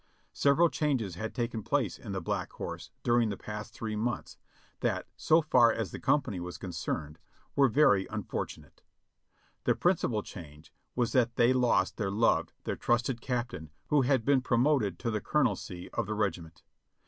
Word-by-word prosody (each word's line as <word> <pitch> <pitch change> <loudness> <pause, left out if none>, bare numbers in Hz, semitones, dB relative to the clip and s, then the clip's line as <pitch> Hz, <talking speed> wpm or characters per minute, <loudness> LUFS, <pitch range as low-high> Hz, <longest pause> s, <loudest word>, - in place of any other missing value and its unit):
Several 145 +5 +4
changes 135 - -1
had 110 +6 -5
taken 120 -2 -2
place - - -1
in - - -8
the - - -2
Black - - -2
Horse - - -6
during 120 -2 +3
the 100 - -4
past 105 +1 -7
three 110 -1 -4
months, 120 +3 -3 0.4
that, - - -1
so 160 +1 +3
far 120 -6 +5
as 110 -7 -3
the - - -6
company 120 -10 +1
was 90 0 -6
concerned, 80 -4 -4 0.4
were 140 -1 +5
very 115 -7 +4
unfortunate. - - -5 0.8
The - - +3
principal 140 - +1
change 75 -4 -11 0.2
was 120 -1 +1
that 120 -3 +2
they 120 +2 +4
lost 120 -7 +2
their 100 -3 -1
loved, 110 +4 +2
their - - -2
trusted 120 0 0
captain, 120 -11 -3 0.2
who 150 -2 +4
had 130 -3 +2
been 140 -2 +4
promoted 120 - +2
to 115 - -2
the 105 -2 -1
colonelcy 100 -10 -1
of - - -2
the 110 - -2
regiment. 85 -6 -3
115 Hz, 165 wpm, -30 LUFS, 100-130 Hz, 0.8 s, far